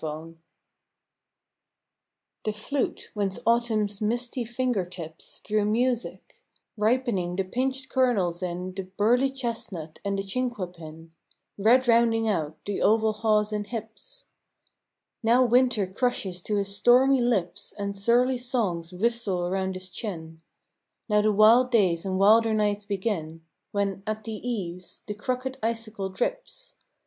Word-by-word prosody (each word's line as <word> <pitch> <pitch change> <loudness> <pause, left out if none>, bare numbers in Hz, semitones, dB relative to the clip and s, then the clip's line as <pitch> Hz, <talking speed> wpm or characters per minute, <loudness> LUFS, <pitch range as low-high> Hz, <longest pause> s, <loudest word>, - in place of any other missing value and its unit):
WINTER 160 +2 -6 2.1
The 215 - 0
flute, 250 +6 -3
whence 200 -2 -1
Autumn's 220 -3 +1
misty 240 +3 -1
finger 240 -3 -1
tips 170 -3 -10
Drew 215 -1 +1
music 240 +3 -1 0.4
ripening 215 -5 0
the 195 - 0
pinched 260 +6 -2
kernels 200 -10 +1
in 180 +1 -4
The 190 0 -5
burly 245 +6 +3
chestnut 225 - -5
and 200 -1 -1
the 195 - -2
chinquapin, 180 -8 -5 0.4
Red 240 +5 +4
rounding 230 -1 +4
out 160 -7 -1
the 205 -1 -3
oval 220 0 +3
haws 215 -1 +1
and 205 -1 -2
hips, 235 - -8 1.0
Now 240 +2 +4
Winter 245 -3 +3
crushes 190 -3 -1
to 210 - 0
his 200 -1 -1
stormy 255 +4 +5
lips 205 -5 -1
And 200 -1 -3
surly 240 +5 +2
songs 200 -10 -1
whistle 200 -2 0
around 190 +1 -1
his 185 0 -6
chin: 165 -7 -6 0.7
Now 210 0 +4
the 215 +1 +3
wild 225 +5 +6
days 190 -8 +2
and 185 0 -1
wilder 220 +3 +5
nights 205 -1 0
begin 185 -6 -3 0.3
When, 200 -1 -1
at 215 0 -3
the 225 - -6
eaves, 190 -6 -5
the 210 - -4
crooked 255 +5 -3
icicle 225 -3 -3
drips. - - -4
210 Hz, 130 wpm, -26 LUFS, 190-240 Hz, 2.1 s, wild